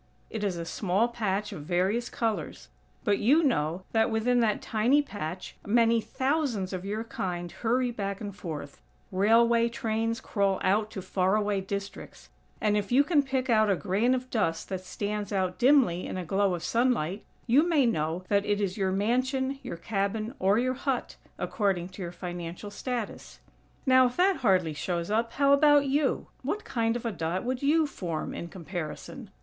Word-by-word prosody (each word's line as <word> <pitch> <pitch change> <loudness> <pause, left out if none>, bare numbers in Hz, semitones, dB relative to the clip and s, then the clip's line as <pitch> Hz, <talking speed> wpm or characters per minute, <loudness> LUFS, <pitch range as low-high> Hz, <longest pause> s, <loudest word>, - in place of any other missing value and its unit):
It 220 -2 -4
is 190 -4 -1
a 170 - -4
small 200 +6 0
patch 210 -3 -2
of - - -7
various 190 +8 0
colors; 175 - -3 0.3
but 205 -1 +2
you 295 +9 +4
know 170 - 0
that, 225 0 +3
within 235 +2 +2
that 220 -3 +2
tiny 245 +7 +2
patch, 185 - -6
many 230 +1 +3
thousands 260 -8 -1
of 185 -1 -4
your 210 +3 -3
kind 175 -6 -4
hurry 245 +2 0
back 200 -3 -4
and 205 -3 -6
forth; 155 -7 -7 0.3
railway 230 +4 +4
trains 225 0 -1
crawl 200 -6 0
out 210 +3 +2
to 190 -3 -7
far 185 +1 +1
away 205 -2 +1
districts; 200 +1 -7 0.3
and, 210 -1 +2
if 205 0 -1
you 270 +4 +6
can 300 -1 +3
pick 265 -2 -2
out 215 -3 +4
a 195 - +4
grain 205 +8 +1
of 255 0 -5
dust 165 -8 -1
that 185 -1 -4
stands 205 +2 -4
out 185 -2 -1
dimly 245 -10 +4
in - - -4
a 180 - -4
glow 195 +2 +1
of 170 - -7
sunlight, 220 -4 0 0.2
you 255 +4 +5
may 300 -6 +4
know 165 -4 0
that 200 -1 +2
it 205 0 0
is 195 -1 -1
your 190 -2 +1
mansion, 260 +7 0
your - - -6
cabin 215 +5 -2
or 195 +3 +3
your 255 +2 +1
hut, 265 -1 -2 0.2
according 195 -5 -1
to 190 +1 -10
your 170 -1 -4
financial 175 +2 -6
status. 240 0 -5 0.5
Now, 260 -1 +6
if 245 - -7
that 375 +1 +4
hardly 185 -9 +2
shows 170 +4 -3
up, 230 +2 0
how 280 0 +4
about 290 0 +5
you? 275 0 +1 0.2
What 400 +11 -3
kind 230 -2 0
of 240 - -4
a 230 - 0
dot 170 0 -2
would 250 +1 -2
you 310 +3 +3
form 175 - -4
in 170 - -5
comparison? 180 - -7
210 Hz, 180 wpm, -28 LUFS, 185-245 Hz, 0.5 s, you